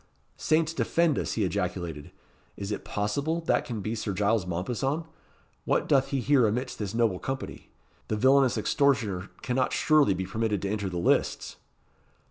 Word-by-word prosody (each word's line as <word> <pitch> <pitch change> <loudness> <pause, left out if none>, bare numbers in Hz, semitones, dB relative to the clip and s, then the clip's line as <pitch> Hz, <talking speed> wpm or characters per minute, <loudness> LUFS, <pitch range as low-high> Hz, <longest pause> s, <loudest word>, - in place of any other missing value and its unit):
"Saints 160 +1 +1
defend 165 -2 +1
us!" - - -2
he 110 - 0
ejaculated. 90 -5 -3 0.5
"Is 100 +1 -5
it 105 - -4
possible 140 +11 -1
that 165 - +1
can 115 -4 -4
be 110 +3 -3
Sir 110 -3 -3
Giles 100 0 +1
Mompesson? 125 - -2 0.6
What - - 0
doth 135 -2 +3
he 135 -2 -1
here 135 -4 +4
amidst 125 +5 -3
this 105 0 -4
noble 115 -6 +1
company? 135 0 -6 0.4
The 110 - -1
villainous 130 +1 +4
extortioner 110 -6 +1
cannot 125 0 0
surely 150 -11 +4
be 95 +1 -3
permitted 105 0 -1
to 100 - -1
enter 100 -2 -2
the 90 - -4
lists." 85 - 0
110 Hz, 160 wpm, -27 LUFS, 100-135 Hz, 0.6 s, here